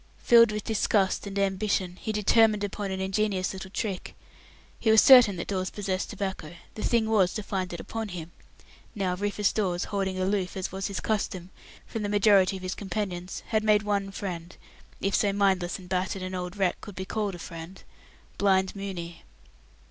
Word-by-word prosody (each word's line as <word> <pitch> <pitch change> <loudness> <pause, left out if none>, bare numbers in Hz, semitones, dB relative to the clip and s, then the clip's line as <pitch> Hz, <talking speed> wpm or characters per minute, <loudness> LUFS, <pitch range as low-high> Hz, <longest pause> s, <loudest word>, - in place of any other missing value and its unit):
Filled 235 -2 +6
with 210 -1 -3
disgust 205 -2 +1
and 200 0 -5
ambition, 195 -2 0
he 220 - -4
determined 210 0 +3
upon 205 0 -3
an 190 0 -3
ingenious 190 -1 0
little 190 0 -7
trick. 195 -1 -4 0.6
He 225 - +1
was 220 0 +7
certain 250 -7 +8
that 170 - -5
Dawes 185 -2 -2
possessed 195 -2 -3
tobacco; 190 -4 -5 0.2
the 215 - -7
thing 230 -1 +2
was 200 -5 +2
to 215 - -3
find 190 -2 -3
it 170 - -6
upon 225 -1 -5
him. 170 -2 -7 0.6
Now, 190 -3 0
Rufus 205 +1 0
Dawes, 180 -5 0
holding 195 -2 -2
aloof, 190 0 -1
as 190 - -3
was 190 0 -3
his 200 -2 -4
custom, 190 -4 -2 0.3
from 225 - -5
the 205 - -2
majority 200 -2 +4
of 185 - -11
his 185 0 -2
companions, 190 -3 -4
had 220 -1 +1
made 215 -1 +4
one 200 -1 -1
friend 180 -3 -6 0.4
if 195 0 0
so 205 - +3
mindless 190 -3 +1
and 185 - -13
battered 185 +1 -2
an 185 0 -5
old 180 +1 -5
wreck 190 -3 0
could 205 - -10
be 190 - -5
called 205 -1 -2
a - - -8
friend 170 +2 -9 0.6
Blind 190 -1 +2
Mooney. 180 -4 -6
195 Hz, 185 wpm, -27 LUFS, 185-210 Hz, 0.6 s, certain